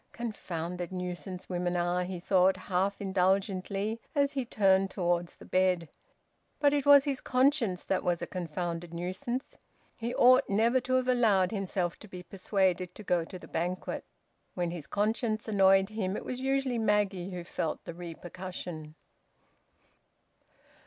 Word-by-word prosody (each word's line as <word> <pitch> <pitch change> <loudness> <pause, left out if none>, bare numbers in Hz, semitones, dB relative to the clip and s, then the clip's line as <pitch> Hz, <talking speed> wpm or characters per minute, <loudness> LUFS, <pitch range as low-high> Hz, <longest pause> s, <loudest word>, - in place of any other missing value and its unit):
"Confounded 180 -6 -4
nuisance 180 0 -5
women 180 -1 -1
are!" 175 +1 +1
he 180 -1 -5
thought, 185 +1 +3
half 190 +1 -1
indulgently, 195 +2 0
as 280 -1 +3
he 270 -3 -2
turned 195 -3 +3
towards 175 -2 -1
the - - -14
bed. 185 -3 +1 0.7
But 285 -1 +4
it 285 -1 0
was 285 -1 +9
his 275 -2 -2
conscience 255 -8 +2
that 190 - 0
was 175 -1 +1
a 170 - -3
confounded 170 -1 -4
nuisance. 235 +10 -4 0.4
He 235 +2 -4
ought 255 +2 +6
never 230 +5 +3
to 255 +1 -1
have 255 0 +1
allowed 215 -7 +3
himself 190 -4 -2
to 215 - -12
be 180 -2 -9
persuaded 185 -2 0
to 215 - -9
go 175 -3 +1
to 185 - -9
the - - -12
banquet. 180 +2 -3 0.5
When 175 -2 -1
his 170 -4 -7
conscience 215 +1 -1
annoyed 195 -2 +4
him, 205 -3 -2
it - - -7
was 255 0 -4
usually 270 -2 0
Maggie 205 -4 +1
who 180 -2 -5
felt 165 -2 -3
the 170 - -6
repercussion. 175 -2 -7
190 Hz, 150 wpm, -30 LUFS, 180-225 Hz, 0.7 s, was